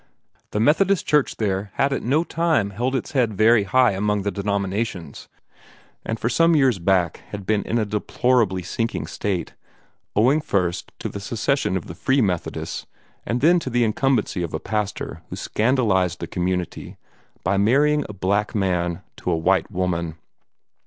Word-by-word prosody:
The 105 - -2
Methodist 175 - +3
Church 150 -2 +2
there 100 -2 -1
had 140 0 +2
at - - -2
no 145 +7 +2
time 165 -13 +1
held 125 +7 -1
its 130 - -3
head 120 -7 +1
very 110 +1 +4
high 125 +4 +4
among 105 +1 0
the 100 - -1
denominations, 100 -5 -3 0.8
and 115 0 -3
for - - -1
some 165 +6 +4
years 130 -8 +3
back 90 -2 +1
had 100 -2 -7
been 105 +1 +1
in 115 - 0
a 110 - +1
deplorably 105 -1 +1
sinking 115 +6 -2
state, 95 -4 -3 0.6
owing 130 +9 +4
first 90 - -1
to - - -4
the 100 - -6
secession 115 0 0
of 90 - -6
the - - -8
Free 135 +10 +1
Methodists 95 -8 -2 0.4
and 120 +1 -1
then 175 +4 +5
to 135 - -5
the 120 -1 +2
incumbency 115 -3 +1
of 85 -2 -3
a - - -2
pastor 105 -2 -3
who - - -5
scandalized 105 -7 +1
the - - -3
community 90 +1 -3 0.5
by 100 - +1
marrying 145 +8 +3
a - - -6
black 100 +3 0
man 90 -4 0
to - - -4
a 85 - +2
white 90 +2 +2
woman. 90 -4 -2
105 Hz, 165 wpm, -23 LUFS, 95-125 Hz, 0.8 s, then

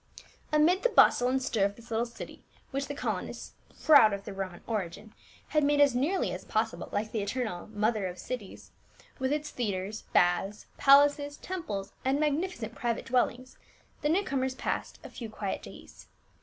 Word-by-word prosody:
Amid 315 +5 +4
the - - +3
bustle 245 - +5
and 260 +1 +2
stir 230 -5 0
of 200 +1 +1
this 235 +1 -16
little 230 +2 0
city, 235 - -10 0.3
which 275 +1 -2
the 285 - -5
colonists, - - -4 0.3
proud 285 -9 +7
of 200 0 -5
their - - -6
Roman 190 -2 -5
origin, 205 0 -4 0.4
had 305 -1 +2
made 290 0 +3
as 285 -3 +6
nearly 295 +10 0
as - - -6
possible - - -2
like 215 +1 -2
the 220 - -1
eternal 210 -3 -3
Mother 215 -1 0
of 180 0 -7
Cities, 210 0 -7 0.5
with 260 +1 0
its 300 0 -2
theatres, 205 -2 -3
baths, 180 +4 +2
palaces, 285 +1 +5
temples, 210 - -5
and 265 +2 +2
magnifi 305 +5 0
cent 225 -1 -6
private 235 -1 -2
dwellings, 255 +1 -1 0.4
the 295 - +1
new 370 +6 +3
comers 265 -5 -1
passed - - -3
a - - -9
few 230 -3 -7
quiet 205 -2 -4
days. - - -13
245 Hz, 175 wpm, -29 LUFS, 205-285 Hz, 0.5 s, proud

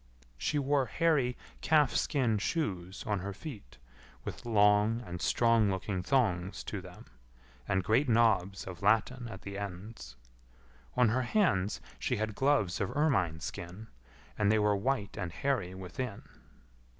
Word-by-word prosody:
She 150 - 0
wore 140 -2 +2
hairy 145 -5 +1 0.2
calf 150 -4 +4
skin 120 -8 +1
shoes 95 - -2
on 105 -2 0
her 100 +2 -5
feet, 105 - -9 0.5
with 120 - -7
long 105 +1 +4
and 90 -1 -6
strong 115 -3 +3
looking 95 0 -2
thongs 95 -6 0
to 100 - -5
them, 90 -1 -12 0.6
and 95 0 +1
great 125 +8 +2
knobs 100 -5 +2
of 90 -2 -8
latten 115 +4 +2
at 95 - -9
the 100 0 -5
ends. 100 - -7 0.8
On 125 -3 +5
her 125 +4 +1
hands 120 - +1 0.2
she - - 0
had 110 0 -2
gloves 135 -8 +1
of 100 - -2
ermine 95 - +2
skin, 90 +7 -7 0.5
and 105 -1 +3
they 110 - +4
were 105 -1 +3
white 105 -1 -1
and 90 -3 -3
hairy 100 -5 -1
within. 100 +4 -5
105 Hz, 145 wpm, -31 LUFS, 95-125 Hz, 0.8 s, On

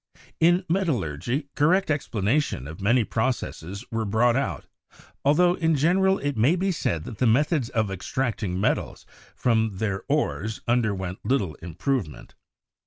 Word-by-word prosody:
In 175 +3 +4
metallurgy, 140 - -1
correct 180 +4 +2
explanations 115 - 0
of 80 +5 -9
many 120 +5 +3
processes 110 -5 -3
were 115 -1 -1
brought 110 +3 +2
out, 135 +1 -2 0.6
afltho 175 +5 +4
in 160 -1 +2
general 190 +6 +3
it 145 -1 -2
may 125 +10 +3
be 190 +2 0
said 85 - -1
that 110 - -9
the 125 - +3
methods 135 +2 +2
of 110 -4 -1
extracting 105 -1 -2
metals 105 - -1 0.3
from 110 -4 +1
their 100 -2 -2
ores 95 +10 -1
underwent 100 -6 0
little 115 - 0
improvement. 85 - -3
120 Hz, 135 wpm, -25 LUFS, 100-150 Hz, 0.6 s, In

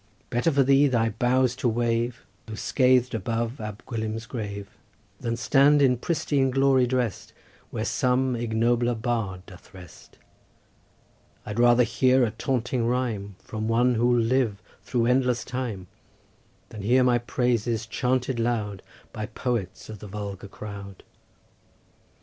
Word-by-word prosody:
Better 125 +7 +2
for 140 -1 +3
thee 140 +2 +5
thy 115 -4 +1
boughs 125 +3 +1
to 130 - 0
wave, 115 0 -1 0.2
Though 110 - -6
scath'd, 125 +1 +2
above 115 +2 -2
Ab 105 -1 -7
Gwilym's 110 -1 -4
grave, 100 -4 -5 0.5
Than 115 0 -2
stand 140 +4 +4
in 130 -3 +4
pristine 140 0 0
glory 135 -1 +3
drest 125 -4 -2 0.4
Where - - -3
some 130 0 +1
ignobler 120 +1 +1
bard 110 -6 -3
doth 95 +1 -15
rest; 90 -3 -14 1.3
I'd 105 +2 -4
rather 120 0 +6
hear 125 +2 +3
a 115 - +1
taunting 120 +1 -1
rhyme 115 -6 -2
From 110 0 -5
one 120 +2 +3
who'll 120 +1 +2
live 115 -3 +1 0.2
through 115 +4 0
endless 125 -1 +2
time, 125 -7 -4 0.8
Than 105 - -8
hear 125 +6 +3
my 125 -1 +3
praises 120 -2 -1
chanted 125 +2 -1
loud 110 -4 -1 0.3
By 110 -1 -4
poets 105 -8 -3
of 110 -2 -9
the 105 - -9
vulgar 100 -1 -6
crowd." 100 -1 -9
120 Hz, 135 wpm, -25 LUFS, 110-125 Hz, 1.3 s, rather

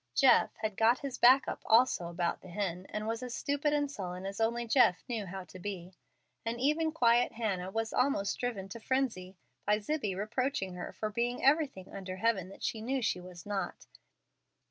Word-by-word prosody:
Jeff 265 -3 +5
had 215 -2 -3
"got 230 +3 +5
his 270 -2 -6
back 260 +3 +7
up" - - -4
also 225 -6 +4
about 170 0 -2
the - - -12
hen, 185 -1 -3
and 210 0 -4
was 225 +1 -2
as 250 -1 -5
stupid 285 +1 0
and 290 -1 +1
sullen 185 -5 -5
as 195 +3 -4
only 235 +1 +1
Jeff 225 -7 +4
knew 225 -5 -3
how 190 +1 -6
to 185 0 -12
be; 185 -1 -6 0.5
and 230 +1 -3
even 305 +4 +2
quiet 240 -6 +3
Hannah 200 -6 -2
was 225 +2 -2
almost 250 -6 +1
driven 225 -6 -3
to 230 - -7
frenzy 220 -8 -1 0.3
by 210 +1 +3
Zibbie 215 -3 -2
reproaching 215 -1 -1
her 180 - -6
for 215 -1 -4
being 240 +4 -1
everything 275 - +2
under 185 -2 -5
heaven 190 -3 0
that 195 - -12
she 220 - -2
knew 265 +4 -1
she 180 -4 0
was 180 -1 -11
not. 205 -2 -3
220 Hz, 190 wpm, -32 LUFS, 190-250 Hz, 0.5 s, back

